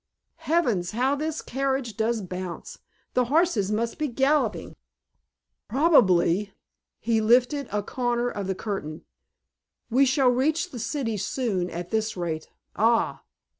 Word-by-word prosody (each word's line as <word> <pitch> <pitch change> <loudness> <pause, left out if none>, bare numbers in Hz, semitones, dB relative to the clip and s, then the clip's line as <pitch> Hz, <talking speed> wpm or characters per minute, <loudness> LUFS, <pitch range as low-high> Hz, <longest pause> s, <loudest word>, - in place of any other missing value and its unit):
Heavens, 235 - +1
how 255 +5 +1
this 310 +2 -3
carriage 265 -3 -2
does 225 0 0
bounce. 180 -1 -7 0.3
The 250 - +2
horses 260 - +2
must 230 +6 -2
be 305 - 0
galloping." 275 +4 0 0.9
"Probably." 205 - +3 0.5
He 225 -1 +1
lifted 250 +5 +3
a 205 0 -1
corner 240 +1 -1
of 205 -5 -4
the 190 - -1
curtain. 180 -7 -5 0.9
"We 270 +3 +4
shall 265 0 +3
reach 310 +8 0
the 245 - -7
city 230 -3 -2
soon 200 -3 -1
at 175 +1 -6
this 220 -2 -1
rate. 160 -3 -3 0.3
Ah!" 230 +2 +2
235 Hz, 130 wpm, -25 LUFS, 200-270 Hz, 0.9 s, We